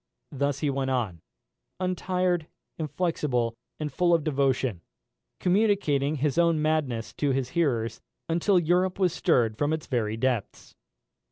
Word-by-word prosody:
Thus 140 0 -1
he 150 -2 +1
went 135 -1 -1
on, 110 -11 -1 0.6
untired, 180 -2 0 0.3
inflexible, 150 -7 -1 0.3
and 150 -3 -4
full 175 +1 +3
of 165 - 0
devotion, 135 - 0 0.6
communicating 180 -8 +2
his 150 +2 0
own 170 -2 +3
madness 150 -7 -1
to 145 - +1
his 135 -2 0
hearers, 125 -8 0 0.3
until 175 +4 +2
Europe 180 +2 +2
was 185 -4 +2
stirred 115 -13 +2
from 145 +1 +1
its 160 - -3
very 110 -5 -1
depths. 120 -3 -2
150 Hz, 135 wpm, -27 LUFS, 130-170 Hz, 0.6 s, full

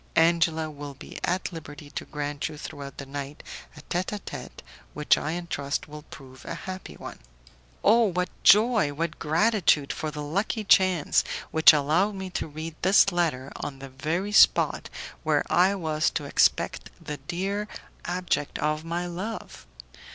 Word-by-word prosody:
Angela 165 -1 +3
will 145 -1 -8
be - - -10
at 185 +1 -1
liberty 145 -2 -9
to - - -5
grant 145 -1 -4
you 155 - -9
throughout 140 -2 -8
the 140 - -6
night 140 +1 -7 0.3
a - - -10
tete 175 +4 -2
a 210 - -3
tete 200 - -9 0.3
which, 150 0 +4
I 160 +4 -3
trust, 140 -2 -3
will 150 0 -9
prove 130 -2 -12
a - - -5
happy 185 0 -7
one." - - -9 0.6
Oh! 230 +2 +5
what 180 -2 -1
joy 210 -7 +5
what 165 +2 -3
gratitude 160 -3 +2
for 155 - -4
the 150 0 -6
lucky 200 +8 -1
chance 185 -5 +4 0.3
which 160 0 +8
allowed 160 +8 +1
me 190 -1 -6
to - - -3
read 155 +1 -7
this 195 +1 +5
letter 155 -7 -1
on 135 - -5
the 135 0 -9
very 160 +9 -2
spot - - +4 0.3
where - - +2
I 185 +3 +4
was 155 -4 0
to - - -2
expect - - +1
the 150 - -6
dear 195 +8 -3 0.4
abject 175 -4 -2
of 155 +1 -1
my 170 +2 -3
love! 185 +6 -6
160 Hz, 160 wpm, -26 LUFS, 145-185 Hz, 0.6 s, which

